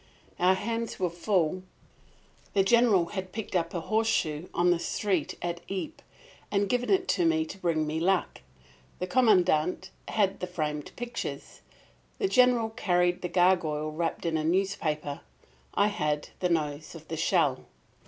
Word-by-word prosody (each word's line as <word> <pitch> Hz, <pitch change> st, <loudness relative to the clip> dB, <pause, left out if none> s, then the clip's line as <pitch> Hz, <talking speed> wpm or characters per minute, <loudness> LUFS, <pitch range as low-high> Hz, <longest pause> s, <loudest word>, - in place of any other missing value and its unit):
Our 185 Hz, +1 st, +4 dB
hands 230 Hz, +4 st, -3 dB
were 180 Hz, -2 st, 0 dB
full. 180 Hz, 0 st, 0 dB, 0.9 s
The 195 Hz, -, +5 dB
General 210 Hz, -5 st, +4 dB
had 190 Hz, -2 st, -4 dB
picked 220 Hz, -2 st, -5 dB
up 170 Hz, -1 st, +1 dB
a 170 Hz, -, -1 dB
horseshoe 185 Hz, -6 st, 0 dB
on 175 Hz, +1 st, +3 dB
the 175 Hz, -, +2 dB
street 185 Hz, -2 st, -1 dB
at 170 Hz, 0 st, -3 dB
Ypres 240 Hz, +12 st, -5 dB, 0.5 s
and 200 Hz, 0 st, +1 dB
given 245 Hz, +4 st, 0 dB
it 380 Hz, -1 st, +2 dB
to 355 Hz, -, +2 dB
me 330 Hz, -1 st, +2 dB
to 300 Hz, -11 st, -9 dB
bring 165 Hz, -4 st, 0 dB
me 155 Hz, +1 st, -2 dB
luck; 185 Hz, +2 st, 0 dB, 0.6 s
the 180 Hz, -, -2 dB
Commandant 185 Hz, -5 st, +2 dB, 0.2 s
had 200 Hz, -3 st, +1 dB
the 180 Hz, -, -3 dB
framed 150 Hz, -4 st, -3 dB
pictures. 240 Hz, -1 st, -6 dB, 0.6 s
The 395 Hz, -, +1 dB
General 250 Hz, -7 st, +4 dB
carried 180 Hz, -4 st, +1 dB
the 180 Hz, -, -3 dB
gargoyle 170 Hz, -4 st, +2 dB
wrapped 165 Hz, +2 st, -3 dB
in 165 Hz, -1 st, +1 dB
a 155 Hz, -, -1 dB
newspaper. 160 Hz, -5 st, -1 dB, 0.5 s
I 205 Hz, -, +4 dB
had 150 Hz, -7 st, -2 dB
the 180 Hz, -, 0 dB
nose 155 Hz, -2 st, -2 dB
of -, -, -12 dB
the -, -, -4 dB
shell. -, -, +1 dB
180 Hz, 155 wpm, -28 LUFS, 165-215 Hz, 0.9 s, The